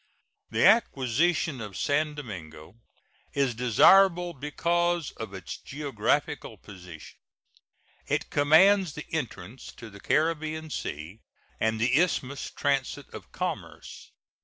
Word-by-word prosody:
The - - +2
acquisition 150 - +2
of 105 -4 -7
San 150 +1 0
Domingo 85 - -9 0.6
is 140 -3 +1
desirable 175 - +5
because 170 +3 -1
of 110 -4 -8
its 95 -2 -7
geographical 140 -7 -2
position. 90 -5 -13 0.9
It - - -2
commands 165 +4 +5
the 150 - -7
entrance 130 -5 -5
to 115 -2 -11
the 100 - -13
Caribbean 155 +3 -1
Sea 80 - -6 0.4
and 110 0 0
the 125 +6 +3
Isthmus 140 -6 -2
transit 140 -2 -2
of - - -10
commerce. - - -6
140 Hz, 110 wpm, -27 LUFS, 110-160 Hz, 0.9 s, desirable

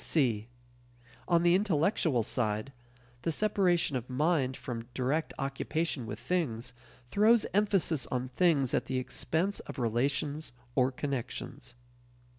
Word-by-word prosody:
(c) 115 -8 +2 0.8
On 170 -1 +3
the 175 0 +5
intellectual 165 - +2
side, 110 +2 -1 0.5
the 165 - 0
separation 180 -5 +2
of 125 0 -3
"mind" 135 -1 +1
from 115 -2 -5
direct 140 +5 0
occupation 135 -1 -2
with 105 - -5
things 125 -9 -2 0.4
throws 220 +4 +5
emphasis 195 - +2
on 125 0 -2
things 140 -3 +2
at - - +1
the 130 - -2
expense 160 +9 -1
of - - -9
relations 135 +5 -1 0.2
or 130 0 +3
connections. 135 -3 -5
140 Hz, 120 wpm, -31 LUFS, 125-170 Hz, 0.8 s, the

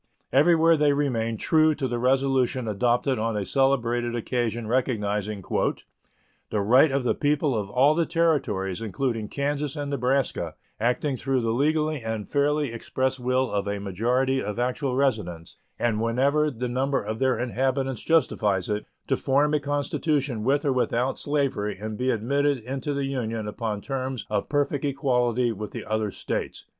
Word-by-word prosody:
Everywhere 165 +3 +5
they 150 -2 +3
remained 115 -6 -1
true 155 -1 +3
to 135 -3 -2
the 120 -1 -2
resolution 130 -1 +1
adopted 120 +5 +1
on 110 -1 -1
a 100 - -2
celebrated 120 -3 +1
occasion 120 -1 -2
recognizing 105 -5 -1
"the 105 - -4
right 125 +9 +5
of 135 -1 0
the 125 - +2
people 145 -2 +1
of 105 -3 -2
all 135 +7 +4
the 165 0 +1
Territories, 135 - 0
including 115 0 -2
Kansas 145 +2 -2
and 145 -1 -4
Nebraska, 125 - 0 0.2
acting 125 +4 0
through 135 0 0
the 115 -1 0
legally 155 +3 +1
and 110 -2 -4
fairly 145 -2 +1
expressed 130 +3 -2
will 125 +1 0
of 100 0 -1
a 100 0 -1
majority 125 +7 0
of 105 +1 -4
actual 125 +2 -1
residents, 105 -12 -1 0.2
and 110 -2 0
whenever 140 +6 +2
the 125 -2 -4
number 130 +2 0
of 110 +2 -4
their 130 -1 +2
inhabitants 130 +1 -1
justifies 105 - +1
it, 105 0 -2 0.2
to - - +1
form 145 +3 +2
a 150 - +3
constitution 145 -3 -1
with 140 +4 +1
or 140 - +2
without 125 0 0
slavery 140 -9 -1
and 110 +2 -5
be 125 +4 -1
admitted 140 +5 +1
into 135 +4 -4
the 140 -1 -1
Union 115 -5 -3
upon 105 -1 -3
terms 130 -2 -4
of 105 -1 -1
perfect 145 -1 0
equality 125 -4 +1
with 105 -1 -5
the - - -6
other 110 -1 -1
States." - - -4
130 Hz, 160 wpm, -25 LUFS, 110-140 Hz, 0.2 s, Everywhere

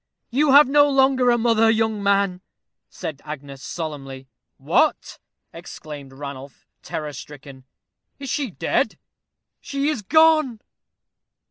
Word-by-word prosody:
"You 275 +2 +3
have 290 0 +8
no 290 +1 +4
longer 265 -2 +3
a 240 - +4
mother, 225 -1 +3
young 220 -1 0
man," 200 -2 +1 0.5
said 150 -3 -7
Agnes, 140 -2 -9
solemnly. 135 -5 -7 0.3
"What!" - - 0 0.3
exclaimed 145 -3 -10
Ranulph, 140 0 -9 0.2
terror 150 -2 -5
stricken; 135 -2 -11 0.5
"is 275 - -8
she 290 -4 -2
dead?" - - -1 0.6
"She 280 +1 -2
is 300 -8 -2
gone." 310 -1 +3
205 Hz, 115 wpm, -22 LUFS, -, 0.6 s, have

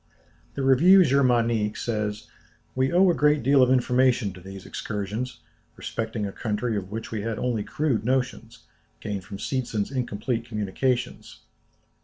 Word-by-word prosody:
The 140 - -2
Revue 170 +9 +6
Germanique 120 -6 +2
says: 105 -2 -3 0.5
"We 130 +1 +1
owe 180 +1 +5
a - - +1
great 150 -3 +2
deal 135 +2 +5
of 125 - +5
information 125 -4 +2
to 90 - -13
these 95 0 -10
excursions, 105 +4 -5 0.3
respecting 110 -1 -4
a 100 - -4
country 110 +2 -2
of 95 -2 -4
which 110 +2 -6
we 110 -2 -3
had 115 +1 -3
only 120 -4 -1
crude 135 -7 -1
notions, 125 -2 -2 0.4
gained 105 -3 -4
from 100 +1 -8
Seetzen's 115 -2 -2
incomplete 120 -2 -2
communications. 120 +3 -2
115 Hz, 145 wpm, -25 LUFS, 105-130 Hz, 0.5 s, Revue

